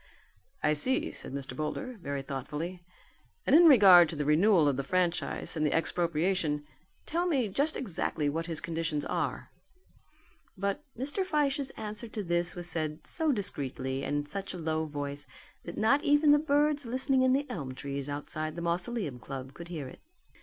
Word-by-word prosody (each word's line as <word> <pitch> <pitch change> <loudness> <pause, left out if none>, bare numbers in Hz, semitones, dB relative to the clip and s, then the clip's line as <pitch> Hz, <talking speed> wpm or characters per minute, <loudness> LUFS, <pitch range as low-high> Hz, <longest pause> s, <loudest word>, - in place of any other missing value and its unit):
"I 150 - +3
see," 255 - +1
said - - -7
Mr. 135 0 -6
Boulder 240 - -4
very 140 -3 -3
thoughtfully, 150 +7 -5 0.6
"and - - +5
in 340 +2 +8
regard 190 - +8
to 160 - -5
the 150 -1 -2
renewal 165 +2 +4
of 140 - +2
the 140 - -1
franchise 180 +3 -1
and 155 - -1
the 150 - +2
expropriation, 165 -2 0 0.4
tell 345 +3 0
me 270 -9 +1
just 285 +10 0
exactly 160 - -2
what 165 +4 -2
his 165 -2 -2
conditions 160 -3 -2
are." - - -3 1.1
But 200 +8 -2
Mr. 285 - -1
Fyshe's 290 -5 0
answer 215 +2 -5
to 215 -1 -5
this 175 0 0
was 175 -1 -2
said 155 -2 -2
so 320 -2 +2
discreetly 135 - -1
and 145 - -1
in 145 - -2
such 195 +4 -6
a - - -5
low 160 -1 -1
voice, 145 -1 -5 0.4
that 170 - -7
not 275 +7 +3
even 290 +1 +5
the 295 - +6
birds 290 -2 +1
listening 260 +2 +2
in 260 0 +4
the 285 +2 0
elm 135 -7 -5
trees 140 +1 -5
outside 155 +2 -4
the 170 - -5
Mausoleum 175 - -2
Club 135 +1 -7
could 170 +3 -9
hear 160 -6 -5
it. - - -12
170 Hz, 175 wpm, -30 LUFS, 150-250 Hz, 1.1 s, in